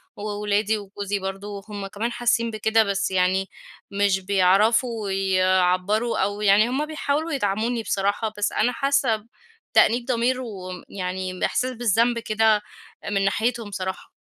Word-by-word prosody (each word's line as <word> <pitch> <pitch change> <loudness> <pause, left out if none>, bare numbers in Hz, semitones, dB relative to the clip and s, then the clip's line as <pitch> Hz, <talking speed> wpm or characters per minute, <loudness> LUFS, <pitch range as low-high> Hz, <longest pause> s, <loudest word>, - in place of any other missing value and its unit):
وولادي 210 +1 -1
وجوزي 200 0 -4
برضو 195 +1 -5
هُم 200 -1 -5
كمان 225 +5 -3
حاسين 235 -1 +1
بكده، 220 +1 +2
بس 195 -1 -1
يعني 190 +1 +1 0.4
مش 200 -1 +2
بيعرفوا 200 +3 +2
يعبروا، 190 +3 +1
أو 205 +2 -1
يعني 210 +3 +4
هُم 285 +4 -1
بيحاولوا 310 +1 -2
يدعموني 225 -1 -1
بصراحة، 205 +3 -1
بس 210 0 0
أنا 245 +3 +1
حاسّة 265 -6 +1 0.5
بتأنيب 240 +1 +4
ضمير، 255 +1 0
وم 185 -6 -7
يعني 185 -1 -4
باحساس 255 0 0
بالذنب 235 +1 +2
كده، 220 -1 +2 0.5
من 195 -1 +1
ناحيتهم 225 +1 -1
صراحة. 190 0 -5
210 Hz, 130 wpm, -23 LUFS, 195-230 Hz, 0.5 s, يعني